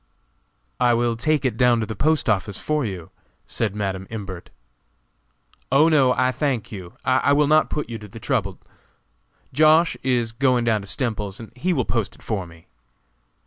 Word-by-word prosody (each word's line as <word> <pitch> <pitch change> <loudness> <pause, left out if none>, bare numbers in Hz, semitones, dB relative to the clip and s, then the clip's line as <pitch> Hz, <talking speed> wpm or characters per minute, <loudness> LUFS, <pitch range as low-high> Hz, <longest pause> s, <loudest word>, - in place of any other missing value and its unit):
"I 120 -1 +4
will 120 0 +1
take 145 +4 0
it 120 -4 0
down 120 -1 +4
to 110 - -1
the 110 - -6
postoffice 110 -8 +1
for 150 -1 -1
you," 95 -7 -6 0.3
said 105 -3 -2
Madam 95 -2 -3
Imbert. 95 -5 -7 1.2
"Oh, 150 +5 +5
no, 140 -5 +4
I 130 +1 +1
thank 130 -6 -2
you, 95 -5 -8
I 130 +2 +3
will 150 +1 +4
not 155 +2 +3
put 150 - -3
you 115 -1 -6
to 105 - -10
the 110 +3 -11
trouble; - - -1 1.0
Josh. 155 +3 +4
is 120 -3 0
going 125 0 +1
down 110 -2 +1
to 100 - -11
Stemples's, 105 -5 -2
and 115 - -10
he 155 +9 -1
will 130 -9 0
post 110 -1 -2
it - - -20
for 100 -5 -3
me." 80 -1 -17
120 Hz, 175 wpm, -22 LUFS, 105-135 Hz, 1.2 s, Oh